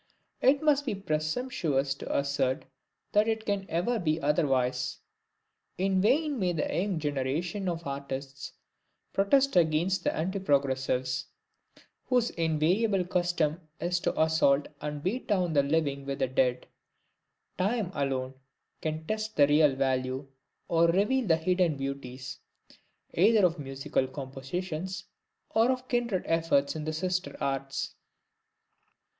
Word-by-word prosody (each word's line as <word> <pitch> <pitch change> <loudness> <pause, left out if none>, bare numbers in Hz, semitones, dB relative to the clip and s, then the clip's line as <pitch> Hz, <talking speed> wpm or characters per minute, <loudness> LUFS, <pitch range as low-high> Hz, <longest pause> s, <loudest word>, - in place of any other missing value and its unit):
It 275 +3 +4
would 295 -2 +3
be 245 -7 -2
presumptuous 155 - -1
to 140 - -3
assert 140 -2 0 0.5
that 210 +1 +4
it 220 -1 -1
can 200 -2 -1
ever 185 +8 0
be 160 -3 0
otherwise. 130 -4 +1 0.8
In 190 0 +2
vain 280 +6 +2
may 180 -3 +1
the 155 - -1
young 190 0 0
generations 155 +6 -1
of 170 -1 -4
artists 140 0 -5 0.6
protest 270 +7 +3
against 170 +2 +2
the - - +2
"Anti 190 +5 -2
progressives," 130 -5 0 0.8
whose 245 -2 +2
invariable 175 +5 +1
custom 175 -3 0 0.2
it 170 - -3
is 175 - +2
to - - -1
assault 155 -3 +3
and 150 -1 -4
beat 225 +8 -2
down 185 -6 +1
the 145 - +5
living 140 -1 0
with 140 0 -2
the 135 -2 +1
dead: 125 -1 +1 0.9
time 200 0 0
alone 135 -3 -1 0.5
can 155 0 -3
test 215 +3 -3
the 145 - +6
real 145 -1 +4
value, 130 0 -1 0.4
or 170 0 +4
reveal 210 +8 +2
the 160 -2 +4
hidden 175 -2 +1
beauties, 135 -1 -5 0.7
either 205 +3 +5
of 170 -2 +1
musical 135 -1 -1
compositions, 155 +7 -5 0.5
or 225 +2 +3
of 255 0 -1
kindred 240 -7 0
efforts 160 -4 +2
in 155 -1 -4
the 155 - -1
sister 180 -3 -2
arts. 135 0 -2
160 Hz, 130 wpm, -29 LUFS, 140-195 Hz, 0.9 s, the